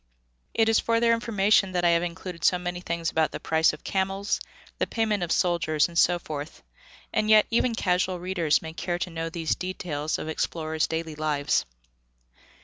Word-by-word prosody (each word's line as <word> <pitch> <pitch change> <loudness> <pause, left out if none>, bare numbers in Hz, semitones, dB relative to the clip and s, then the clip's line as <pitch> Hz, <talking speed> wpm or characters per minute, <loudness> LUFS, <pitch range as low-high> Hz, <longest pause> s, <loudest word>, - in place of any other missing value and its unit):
It 225 -1 +3
is 225 -1 +4
for 230 0 +1
their 230 0 +4
information 205 -4 +2
that 175 -1 +1
I - - +6
have 170 0 +3
included 175 -1 -6
so 180 - +4
many 180 0 -4
things 170 -1 -2
about 160 -1 +2
the - - -5
price 160 0 +2
of 150 - -11
camels, 195 +1 -1 0.4
the - - +1
payment 220 -4 0
of 175 -1 -2
soldiers 170 -3 +2
and 170 - -13
so 175 +1 +4
forth, 150 -3 -7 0.5
and 215 - +1
yet 215 -1 +7
even 235 0 +2
casual 185 -2 0
readers 170 -5 +1
may 160 0 -7
care 175 +1 -2
to 175 0 -4
know 165 0 -3
these 165 -1 -1
details 160 -5 -3
of - - -6
explorers' 160 0 -1
daily 160 -1 -3
lives. 150 -2 0
175 Hz, 185 wpm, -26 LUFS, 160-195 Hz, 0.5 s, yet